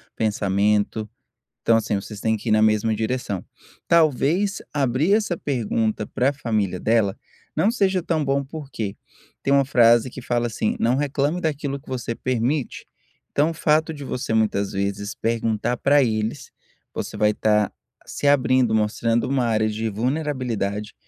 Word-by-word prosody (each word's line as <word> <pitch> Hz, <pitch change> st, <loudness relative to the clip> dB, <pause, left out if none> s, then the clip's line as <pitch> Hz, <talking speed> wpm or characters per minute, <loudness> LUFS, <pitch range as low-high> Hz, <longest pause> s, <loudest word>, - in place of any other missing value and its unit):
pensamento. 105 Hz, 0 st, +1 dB, 0.5 s
Então 115 Hz, -, +3 dB
assim 110 Hz, -2 st, 0 dB
vocês 100 Hz, +1 st, -7 dB
têm 110 Hz, -1 st, +1 dB
que 110 Hz, -, -6 dB
ir -, -, +3 dB
na 110 Hz, 0 st, +4 dB
mesma 110 Hz, 0 st, +3 dB
direção. 110 Hz, -3 st, -2 dB, 0.4 s
Talvez 170 Hz, +5 st, +2 dB
abrir 140 Hz, +5 st, +1 dB
essa 205 Hz, -5 st, +2 dB
pergunta 110 Hz, -6 st, -1 dB
para 135 Hz, +3 st, +1 dB
família 110 Hz, -9 st, -1 dB
dela, 110 Hz, -3 st, +2 dB, 0.4 s
não 210 Hz, -, +3 dB
seja 195 Hz, -6 st, +1 dB
tão 160 Hz, -3 st, 0 dB
bom 140 Hz, +1 st, +1 dB
por 140 Hz, 0 st, -9 dB
quê? 105 Hz, -3 st, -4 dB, 0.5 s
Tem 135 Hz, -, +1 dB
uma 140 Hz, 0 st, +5 dB
frase 120 Hz, -2 st, +5 dB
que 130 Hz, -, -9 dB
fala 120 Hz, -1 st, 0 dB
assim: 110 Hz, -1 st, -1 dB
"Não 120 Hz, +3 st, +2 dB
reclame 145 Hz, +4 st, 0 dB
daquilo 145 Hz, -4 st, -2 dB
que 140 Hz, -, -20 dB
você 120 Hz, -2 st, -3 dB
permite", 130 Hz, +3 st, -2 dB, 0.4 s
então 150 Hz, +3 st, +2 dB
o -, -, -5 dB
fato 155 Hz, 0 st, +2 dB
de 145 Hz, -2 st, -8 dB
você 125 Hz, -3 st, -3 dB
muitas 105 Hz, -3 st, +1 dB
vezes 100 Hz, +1 st, -2 dB
perguntar 115 Hz, +1 st, -1 dB
para 140 Hz, +3 st, +4 dB
eles, 110 Hz, -2 st, -2 dB, 0.4 s
você -, -, -5 dB
vai 105 Hz, 0 st, +3 dB
estar 105 Hz, -1 st, +2 dB, 0.4 s
se -, -, -4 dB
abrindo, 130 Hz, -4 st, +3 dB
mostrando 115 Hz, +3 st, +1 dB
uma 130 Hz, -2 st, +1 dB
área 110 Hz, -1 st, +1 dB
de 110 Hz, +1 st, -3 dB
vulnerabilidade, 115 Hz, -4 st, -2 dB
120 Hz, 155 wpm, -23 LUFS, 110-140 Hz, 0.5 s, uma